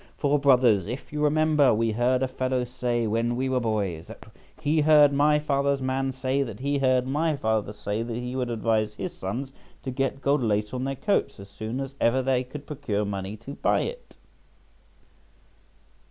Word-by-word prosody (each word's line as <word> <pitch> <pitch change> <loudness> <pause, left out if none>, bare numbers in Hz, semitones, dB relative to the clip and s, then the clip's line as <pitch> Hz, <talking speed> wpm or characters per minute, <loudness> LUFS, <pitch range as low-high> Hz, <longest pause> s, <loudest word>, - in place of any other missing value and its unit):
For, 145 0 +2
brothers, 125 -9 +4
if 125 +5 -7
you 150 - -2
remember, 150 -3 +3
we 115 +1 +1
heard 125 +3 +1
a - - +1
fellow 130 0 -1
say 120 -1 -1
when 115 +2 0
we 130 +2 -1
were 130 -1 +1
boys 100 -8 -2
that - - -12 0.3
he 155 0 +1
heard 150 -1 +6
my 150 +2 +4
father's 140 -2 0
man 130 0 -1
say 130 +1 -1
that 115 -6 -4
he 140 +1 0
heard 130 -1 +2
my 150 +4 0
father 110 -5 -1
say 105 +1 -3
that 115 0 -4
he 125 +1 -4
would 125 -2 -1
advise 110 -2 0
his 180 - -5
sons 125 +9 -4 0.3
to 130 - -3
get 135 +1 -1
gold 140 0 +1
lace 105 -1 0
on 130 0 -2
their 135 0 -2
coats 140 - 0
as 100 0 -11
soon 110 +5 -5
as 135 0 -5
ever 130 +3 +3
they 130 -1 +1
could 140 +3 -9
procure 125 -9 -2
money 100 +1 -4
to 115 +6 -9
buy - - +1
it." - - -7
130 Hz, 190 wpm, -26 LUFS, 115-140 Hz, 0.3 s, heard